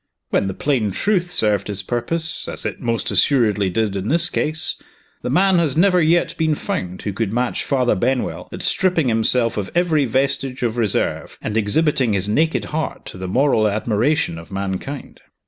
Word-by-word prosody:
When - - +1
the 95 - -4
plain 130 -8 0
truth 180 - 0
served 105 - +1
his 100 -2 -4
purpose, 160 - -1
as - - -4
it - - -4
most 115 -5 -1
assuredly 105 -8 +3
did 105 +1 -1
in 95 +1 -3
this 170 +5 +4
case, 155 0 0 0.4
the - - -4
man 185 +6 +3
has 155 -4 0
never 180 0 +4
yet 165 +2 +2
been 160 -1 +2
found 90 -8 -4
who 100 - -3
could 100 0 -2
match 120 +2 -1
Father 130 -3 +1
Benwell 125 +5 -2
at - - -6
stripping 175 -7 +2
himself 115 +1 +2
of 100 -2 -3
every 165 -5 +2
vestige 130 +1 -1
of 115 -2 0
reserve, 110 -5 -1
and 105 - -4
exhibiting 125 +2 +2
his 100 0 0
naked 155 +10 +1
heart 160 -1 -3
to 90 - -9
the 95 - -5
moral 115 +1 +2
admiration 110 - 0
of 85 +2 -13
mankind. 100 +8 -5
125 Hz, 180 wpm, -20 LUFS, 105-155 Hz, 0.4 s, this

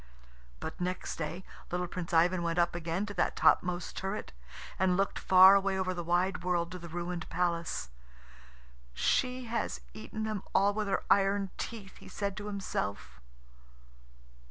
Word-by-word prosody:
But 160 - -6
next 180 +1 -3
day 165 +3 -4 0.3
little 180 0 -1
Prince 175 -1 -5
Ivan 175 +2 +4
went 170 0 -1
up 175 0 +3
again 170 +3 -2
to 205 - -6
that 180 - 0
topmost 180 0 +2
turret, 195 +2 -4 0.5
and 185 -1 +3
looked 195 0 0
far 190 +1 +8
away 195 -1 +2
over 185 -1 0
the 175 -1 -4
wide 175 +2 +1
world 175 -1 0
to 180 - -6
the 170 0 -9
ruined 175 0 -4
palace. 170 - -1 1.0
"She 255 - +1
has 225 - -2
eaten 165 - -6
them 215 -2 -2
all 200 +1 +4
with 215 0 -2
her 195 - 0
iron 195 -1 +3
teeth," 210 -5 -6
he - - -13
said 200 -1 -3
to 210 0 -5
himself. 100 - -4
180 Hz, 155 wpm, -31 LUFS, 170-195 Hz, 1.0 s, far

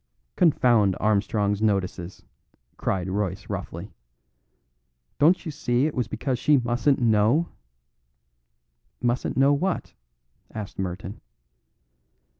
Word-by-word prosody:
"Confound 120 - +3
Armstrong's 105 -1 +1
notices," 95 -4 -2 0.5
cried 95 -2 -2
Royce 95 -1 -3
roughly. - - -6 1.3
"Don't 165 +5 +4
you 160 - -3
see 130 -3 0
it 155 - -1
was 125 -4 -1
because 120 +3 -3
she 150 +2 +4
mustn't 125 +3 +1
know?" 115 +7 +2 1.5
"Mustn't 120 +1 -1
know 135 +2 +5
what?" 180 +6 -2 0.6
asked 105 -3 -7
Merton. 95 +2 -5
115 Hz, 95 wpm, -25 LUFS, 100-135 Hz, 1.5 s, know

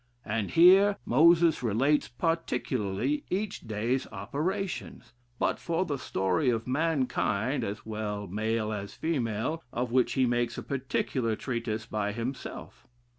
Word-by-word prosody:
And 105 -1 -1
here 190 +4 +6
Moses 165 +4 +5
relates 130 +6 +2
particularly 130 - -1
each 200 +2 -2
day's 115 +5 -1
operations: 190 +6 -4 0.2
but - - 0
for 170 +2 -1
the 145 -5 -3
story 95 +8 0
of 115 -2 0
mankind, 130 -4 0
as 100 +1 -5
well 105 -2 -3
male 110 +3 -1
as 100 -1 -6
female, 135 0 -1
of 120 0 -2
which 125 0 +3
he 130 -2 +3
makes 120 -1 0
a - - -5
particular 130 -3 -1
treatise 115 -3 -3
by 105 -1 -2
himself. 115 - -6
125 Hz, 125 wpm, -29 LUFS, 110-155 Hz, 0.2 s, here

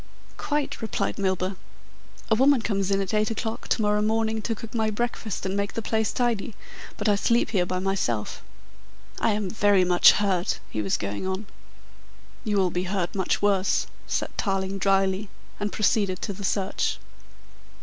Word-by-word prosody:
"Quite," 295 -1 -2
replied 220 -2 -2
Milburgh. 190 -1 0 0.7
"A - - +7
woman 265 +1 +4
comes 195 -3 0
in 195 0 +2
at 195 0 -3
eight 215 0 +2
o'clock 225 0 -4
to 220 - +1
morrow 210 0 +2
morning 220 +1 +1
to 225 +1 -2
cook 220 +1 -9
my 220 -2 +1
breakfast 220 -2 -3
and 190 +1 -1
make 200 0 -1
the 230 - -3
place 220 -1 0
tidy, 230 -4 -1 0.4
but 210 - -1
I 210 - +5
sleep 230 +3 +2
here 180 -5 +1
by 185 - -1
myself. 180 - -1 0.8
I 225 - +2
am 205 -1 -1
very 205 -1 +3
much 180 -1 +7
hurt," 190 -3 0
he 110 - -2
was 100 -2 0
going 100 - -3
on. 190 +3 -3 1.0
"You 210 -3 0
will 185 -2 +2
be 180 +2 -1
hurt 185 -2 -2
much 190 +1 0
worse," 195 -2 +2 0.2
said - - -2
Tarling 195 -1 -1
dryly 195 +1 +2 0.3
and 205 0 -2
proceeded 200 -4 +1
to 200 - -2
the 200 +1 -8
search. 195 0 0
200 Hz, 170 wpm, -26 LUFS, 190-220 Hz, 1.0 s, A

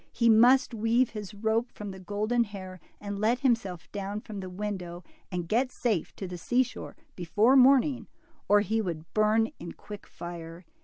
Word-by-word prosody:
He 235 -1 +2
must 245 +4 +5
weave 230 +3 +2
his 210 -1 -7
rope 220 +3 0
from 205 -1 -7
the 190 - -10
golden 210 +5 0
hair 185 -3 -9 0.2
and 205 -1 -5
let 230 +4 +1
himself 225 -9 0
down 200 +1 -4
from 210 -1 -8
the 185 -1 -6
window 180 -2 -5 0.3
and 175 -2 -3
get 250 +7 +1
safe 220 -11 -2
to 190 - -6
the 180 -1 -7
seashore 250 +7 -1 0.2
before 205 +9 +3
morn 265 0 +7
ing, 275 -5 -4 0.4
or 205 0 +6
he 220 +3 0
would 165 -5 -6
burn 215 +1 +3
in 170 - -7
quick 205 -1 -11
fire. 170 0 -9
210 Hz, 175 wpm, -28 LUFS, 185-230 Hz, 0.4 s, morn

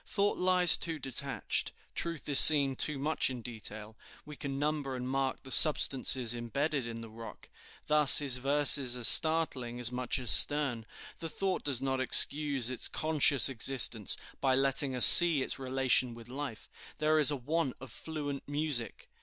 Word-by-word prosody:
Thought 205 0 -5
lies 180 -1 +1
too 165 -1 -9
detached, 135 0 -6 0.2
truth 165 -2 -8
is 145 -2 +5
seen 140 -3 +8
too 150 +2 -2
much 150 +2 -4
in 125 -3 -11
detail; 110 -2 -10 0.3
we 150 - -14
can 140 -1 -10
number 145 -2 -7
and 125 0 -10
mark 135 0 -7
the 130 - -14
substances 130 -5 +2
imbedded 130 +3 -7
in 115 0 -11
the 115 - -14
rock. 115 0 -16 0.4
Thus 150 -3 +5
his 135 -4 0
verses 135 -1 +1
are 125 - -10
startling 130 -5 +2
as 120 0 -2
much 125 -1 -5
as 125 -3 -1
stern; 135 -7 +2 0.3
the 165 - -9
thought 190 +2 -7
does 135 -4 -6
not 135 -1 -6
excuse 140 -1 +3
its 125 - -3
conscious 150 -4 +1
existence 120 -5 -1 0.2
by 130 -1 -3
letting 135 0 -2
us 125 - +4
see 170 -6 +7
its - - -6
relation 130 -2 -3
with 115 -1 -17
life; 135 -3 -11 0.3
there 155 +1 -3
is 145 - +1
a 145 - -3
want 145 +1 -7
of 130 -3 -15
fluent 145 -1 -10
music. 145 -5 -6
135 Hz, 170 wpm, -26 LUFS, 125-150 Hz, 0.4 s, seen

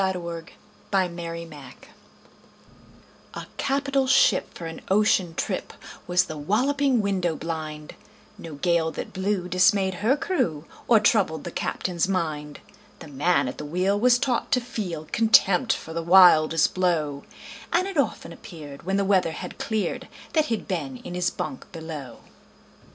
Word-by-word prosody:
Y 190 0 +2
Z - - -4
A - - -5
Nautical 170 0 -8 0.3
Ballad 170 -7 -3 1.6
A - - -6
CAPITAL 275 -1 0
ship 255 -6 +3
for 170 - -7
an 165 0 -7
ocean 190 -4 +2
trip 185 - -3 0.3
Was 180 +1 +3
The 155 -4 -7
Walloping 255 - +1
Window 185 -5 0
blind 155 -2 -6 0.4
No 160 -3 -9
gale 170 +1 +1
that - - -7
blew 190 -1 -1
dismayed 190 +2 +3
her 250 +7 +3
crew 170 - -1 0.2
Or 230 -2 +6
troubled 200 -7 +2
the 175 - -6
captain's 175 0 -2
mind. 155 -6 -3 0.4
The 160 - -11
man 145 +3 +1
at 125 - -6
the - - -5
wheel 185 +6 0
was 245 +2 +5
taught 250 0 -1
to 255 - +4
feel 195 -10 -5
Contempt 220 -5 +4
for 160 - -7
the 165 - -2
wildest 165 -3 +6
blow, 155 -6 0 0.5
And 370 - +2
it 390 - -6
often 210 -9 -1
appeared, 160 -9 -11
when 190 +3 -1
the 200 - +1
weather 185 -4 +2
had 180 +2 -8
cleared, 220 -2 -2 0.3
That 310 -2 +3
he'd 225 -7 -3
been 145 -9 -3
in 175 - -9
his 180 0 0
bunk 265 - -6
below. 160 -7 -8
180 Hz, 155 wpm, -25 LUFS, 160-210 Hz, 1.6 s, Or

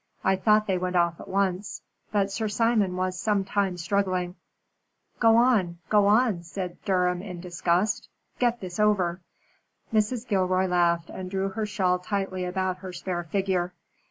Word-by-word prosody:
"I 190 - +3
thought 215 +2 +3
they 190 -3 0
went 180 0 -2
off 170 -1 +2
at - - -10
once, 195 0 -1 0.3
but 200 -2 +1
Sir 220 +2 -2
Simon 210 -3 +1
was 185 0 -2
some 205 -1 +1
time 195 -2 0
struggling." 185 0 0 0.9
"Go 225 -1 +5
on 225 -8 +3
go 205 -1 +4
on," 215 -3 +3
said 180 +1 -6
Durham 180 -2 +1
in 185 -3 -7
disgust. 180 +3 0 0.3
"Get 240 -1 +1
this 180 -1 -6
over." 190 -4 +2 0.7
Mrs. 220 +3 +1
Gilroy 185 -2 +2
laughed 170 -2 +1
and 185 -1 -6
drew 195 +1 -1
her 215 +2 -3
shawl 185 -3 +1
tightly 190 -1 -2
about 185 0 -1
her 185 0 -8
spare 175 -1 -4
figure. 180 0 -1
190 Hz, 155 wpm, -26 LUFS, 180-205 Hz, 0.9 s, Go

